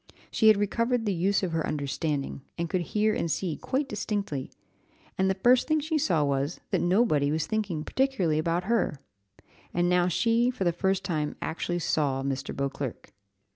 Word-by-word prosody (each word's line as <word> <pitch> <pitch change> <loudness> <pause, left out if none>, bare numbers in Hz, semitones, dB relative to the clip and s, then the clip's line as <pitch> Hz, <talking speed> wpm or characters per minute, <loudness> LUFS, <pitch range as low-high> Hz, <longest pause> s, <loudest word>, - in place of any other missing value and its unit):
She 220 - +3
had 215 -2 +7
recovered 230 +3 0
the 205 - +1
use 195 +3 +1
of 180 - -1
her 165 -1 0
understanding, 145 -1 -2 0.2
and 170 - -1
she - - -5
could 185 - 0
hear 210 +5 +1
and 170 - -1
see 165 -1 -1
quite 270 +2 -2
distinctly; 205 - -3 0.7
and 190 0 +2
the 190 - +1
first 245 +6 +4
thing 310 0 +2
she 310 +1 -1
saw 170 - +2
was, 140 +3 -1
that - - +2
nobody 175 -7 +3
was 155 0 0
thinking 200 -8 -2
particularly 195 - +1
about 170 +2 0
her; 220 -8 0 0.8
and 175 0 +2
now 180 0 +3
she 230 +6 +2
for 250 -6 -3
the 175 - +3
first 190 +2 0
time 155 -6 -2
actually 175 +2 -2
saw 145 -5 0
Mr. 135 0 -3
Beauclerc. 140 -2 -4
180 Hz, 180 wpm, -27 LUFS, 155-215 Hz, 0.8 s, had